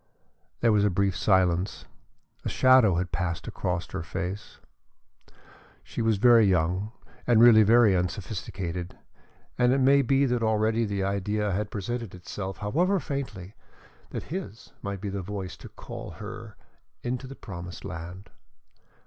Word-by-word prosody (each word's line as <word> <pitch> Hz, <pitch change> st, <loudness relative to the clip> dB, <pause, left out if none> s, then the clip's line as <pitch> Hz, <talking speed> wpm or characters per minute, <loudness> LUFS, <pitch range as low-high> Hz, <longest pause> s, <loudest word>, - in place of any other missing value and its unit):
There 115 Hz, -, +4 dB
was 105 Hz, -1 st, +3 dB
a 105 Hz, -, +4 dB
brief 95 Hz, 0 st, +1 dB
silence. 95 Hz, -1 st, +1 dB, 0.6 s
A -, -, -2 dB
shadow 130 Hz, -7 st, +5 dB
had 90 Hz, +1 st, -2 dB
passed 85 Hz, -2 st, -3 dB
across 90 Hz, -1 st, -2 dB
her 95 Hz, -, -3 dB
face. 95 Hz, +4 st, -5 dB, 1.3 s
She -, -, -5 dB
was 110 Hz, -2 st, +2 dB
very 120 Hz, +1 st, +6 dB
young 95 Hz, +2 st, +1 dB, 0.4 s
and 120 Hz, -2 st, +5 dB
really 115 Hz, -2 st, +8 dB
very 110 Hz, -1 st, +5 dB
unsophisticated, 90 Hz, -1 st, -4 dB, 0.6 s
and 125 Hz, 0 st, +4 dB
it 135 Hz, -, +3 dB
may 135 Hz, +1 st, +5 dB
be 135 Hz, +2 st, +2 dB
that 125 Hz, -2 st, 0 dB
already 110 Hz, +1 st, +1 dB
the 100 Hz, -2 st, -2 dB
idea 100 Hz, +2 st, -1 dB
had 100 Hz, +2 st, -2 dB
presented 110 Hz, 0 st, -4 dB
itself, 95 Hz, +2 st, -6 dB
however 175 Hz, -, +1 dB
faintly, 125 Hz, -, -5 dB, 0.6 s
that -, -, -5 dB
his 175 Hz, -, -7 dB
might 100 Hz, -1 st, -5 dB
be 100 Hz, -, -3 dB
the 100 Hz, 0 st, -3 dB
voice 95 Hz, -2 st, -5 dB
to -, -, -11 dB
call -, -, -9 dB
her 110 Hz, +1 st, -9 dB, 0.5 s
into 125 Hz, +2 st, -3 dB
the 135 Hz, -, -9 dB
promised 90 Hz, -5 st, -8 dB
land. 90 Hz, +2 st, -8 dB
105 Hz, 145 wpm, -27 LUFS, 95-115 Hz, 1.3 s, really